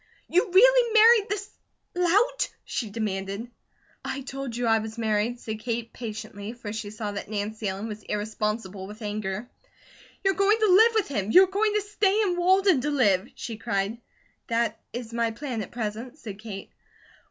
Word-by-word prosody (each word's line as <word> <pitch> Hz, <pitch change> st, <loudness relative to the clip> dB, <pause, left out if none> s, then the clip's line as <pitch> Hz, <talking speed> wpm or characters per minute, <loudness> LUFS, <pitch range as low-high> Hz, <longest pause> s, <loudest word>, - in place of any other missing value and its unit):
"You 365 Hz, +3 st, +2 dB
really 485 Hz, +4 st, +6 dB
married 445 Hz, -1 st, +7 dB
this 410 Hz, 0 st, -3 dB, 0.5 s
lout?" 405 Hz, +8 st, +2 dB, 0.2 s
she 225 Hz, -, -3 dB
demanded. 200 Hz, +1 st, -3 dB, 0.5 s
"I 275 Hz, -, -4 dB
told 270 Hz, -2 st, -6 dB
you 245 Hz, -, -1 dB
I 225 Hz, -1 st, +4 dB
was 220 Hz, +1 st, -6 dB
married," 225 Hz, +1 st, 0 dB
said 220 Hz, -2 st, -5 dB
Kate, 230 Hz, 0 st, -3 dB
patiently, 215 Hz, -2 st, -6 dB
for 225 Hz, -4 st, -7 dB
she 220 Hz, -2 st, -5 dB
saw 210 Hz, 0 st, -4 dB
that 205 Hz, 0 st, -6 dB
Nancy 215 Hz, +1 st, -3 dB
Ellen 195 Hz, +3 st, -3 dB
was 215 Hz, -1 st, -7 dB
irresponsible 210 Hz, -2 st, -3 dB
with 215 Hz, +2 st, -10 dB
anger. 210 Hz, +1 st, -3 dB, 0.8 s
"You're 390 Hz, 0 st, +3 dB
going 395 Hz, +4 st, +3 dB
to 435 Hz, -2 st, +2 dB
live 445 Hz, +4 st, +7 dB
with 435 Hz, -, +2 dB
him, 210 Hz, -8 st, -2 dB
you're 370 Hz, +11 st, +8 dB
going 415 Hz, +3 st, 0 dB
to 420 Hz, -, +3 dB
stay 410 Hz, 0 st, +1 dB
in 365 Hz, -4 st, +1 dB
Walden 370 Hz, -3 st, +4 dB
to 295 Hz, -, -1 dB
live?" 215 Hz, -8 st, +2 dB
she 225 Hz, -2 st, -6 dB
cried. 215 Hz, -1 st, -2 dB, 0.5 s
"That 230 Hz, -1 st, 0 dB
is 235 Hz, -1 st, -6 dB
my 230 Hz, -1 st, +1 dB
plan 235 Hz, 0 st, -4 dB
at 195 Hz, -, -6 dB
present," 235 Hz, +3 st, -5 dB
said 210 Hz, -8 st, -8 dB
Kate. 200 Hz, -3 st, -8 dB
230 Hz, 175 wpm, -26 LUFS, -, 0.8 s, you're